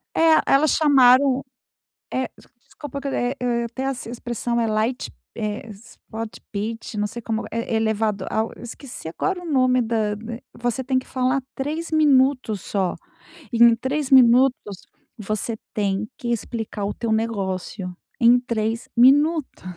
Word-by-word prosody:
É, 325 -1 +5
elas 290 +2 +4
chamaram, 270 -2 +5 0.7
eh, 260 -1 -1
des - - -19 0.2
desculpa 285 -2 -8
que 280 - -5
eu, 275 - -2
eh 245 +1 0
eh, 240 -1 0
eu 235 - -2
até 245 +3 -5
essa 270 -3 -3
expressão 240 0 -3
é 230 - +1
light, 220 +4 -1 0.3
eh, 215 0 -4
spot 220 +1 -9
pit 220 +1 -4
não 210 - 0
sei 235 +3 -8
como 225 0 -3
eh, 230 - -3
é - - +2
elevado 220 -3 0
ao 220 +1 -1
esqueci 240 - -9
agora 360 - -2
o - - -9
nome 255 -3 +3
da 220 -2 0 0.2
eh, 235 0 -6
você 240 +2 -2
tem 260 0 +1
que 255 - -13
falar 255 +1 0
3 310 +5 -3
minutos 265 -7 +3
só 190 -3 -1 0.6
e 235 - -1
em 235 -1 +8
3 270 +4 -2
minutos 255 0 +6 0.6
você 215 +2 -3 0.2
tem 200 0 -1
que 240 - -5
explicar 225 -2 -3
o 205 - -2
teu 230 - -4
negócio. 195 -4 -2 0.2
Em 240 +1 +6
3 230 -2 -2
minutos. 290 +5 +4
235 Hz, 160 wpm, -23 LUFS, 220-265 Hz, 0.7 s, em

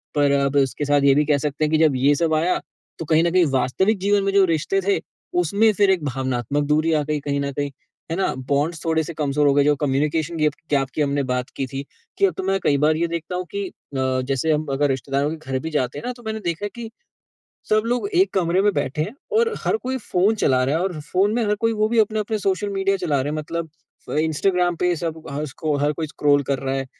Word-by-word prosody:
पर 145 -1 +3
अब 140 0 +1
उसके 140 +1 +1
साथ 145 0 +3
ये 140 -1 +6
भी 150 +1 +3
कह 145 -1 +3
सकते 150 +1 -2
हैं 150 - -2
कि 160 - +4
जब 155 -3 +3
ये 135 +3 +3
सब 160 +2 +1
आया, 165 +4 +1 0.4
तो 165 - -4
कहीं 160 +1 +3
न 170 - +1
कहीं 180 -1 +4
वास्तविक 135 - +1
जीवन 200 +1 +2
में 195 - +1
जो 200 -1 +6
रिश्ते 165 +3 0
थे, 200 +1 +1 0.4
उसमें 200 +6 +3
फिर 200 -1 +3
एक 180 -5 0
भावनात्मक 130 +1 -1
दूरी 155 +2 +2
आ 150 -1 +2
गई 150 0 -2
कहीं 140 0 -2
न 140 0 -2
कहीं। 145 +1 -2 0.4
है - - 0
ना? 195 - 0 0.2
बॉन्ड्स 150 +4 0
थोड़े-से 160 0 0
कमज़ोर 150 -1 +1
हो 140 - +4
गए, 145 0 +4
जो 150 +1 +3
कम्युनिकेशन 150 +4 0
गिप 150 -1 +2 0.2
गैप 135 -2 +2
की - - 0
हमने 140 -1 +1
बात 125 0 -2
की 135 - -1
थी, 135 +2 -5 0.3
कि - - +4
अब 190 - +1
तो 190 - -3
मैं 195 +1 +1
कई 140 - +3
बार 155 +1 +4
ये 170 +1 +1
देखता 170 +1 -4
हूँ 180 0 -3
कि 200 0 -3
अ, - - -11 0.3
जैसे 130 +3 0
हम 150 +1 -1
अगर 145 +1 +1
रिश्तेदारों 135 +2 -1
के 160 - -5
घर 130 - 0
भी - - -2
जाते 130 -5 -1
हैं - - -9
ना 250 - -2
तो 240 - -15
मैंने 220 0 -3
देखा 170 +4 -2
है - - -3
कि, 235 -1 -7 0.8
सब 215 0 +4
लोग 245 +11 0
1 375 +2 +3
कमरे 180 0 +2
में 205 +1 +3
बैठे 145 0 -1
हैं 200 +8 -3 0.3
और 460 -1 +2
हर - - +2
कोई 260 +1 -2
फ़ोन 205 -2 +1
चला 130 -1 +3
रहा 135 +4 +1
है 165 - 0
और 180 -5 -3
फ़ोन 190 +7 +1
में 240 - +1
हर 210 0 +1
कोई 230 0 +2
वो 215 0 +1
भी 235 0 +2
अपने-अपने 215 0 0
सोशल 195 +1 -1
मीडिया 195 0 0
चला 155 -7 0
रहे 145 +3 -2
हैं। 155 - -3
मतलब 165 +2 -4 0.4
अ, - - -4
इंस्टाग्राम 175 +3 +1
पे, 180 +1 +1
सब 160 -1 -4
हसको 150 +1 -3
हर 150 - +2
कोई 160 0 -4
स्क्रॉल 145 -1 +2
कर 135 - 0
रहा 135 0 -2
है, 135 0 -2
155 Hz, 255 wpm, -22 LUFS, 140-190 Hz, 0.8 s, ये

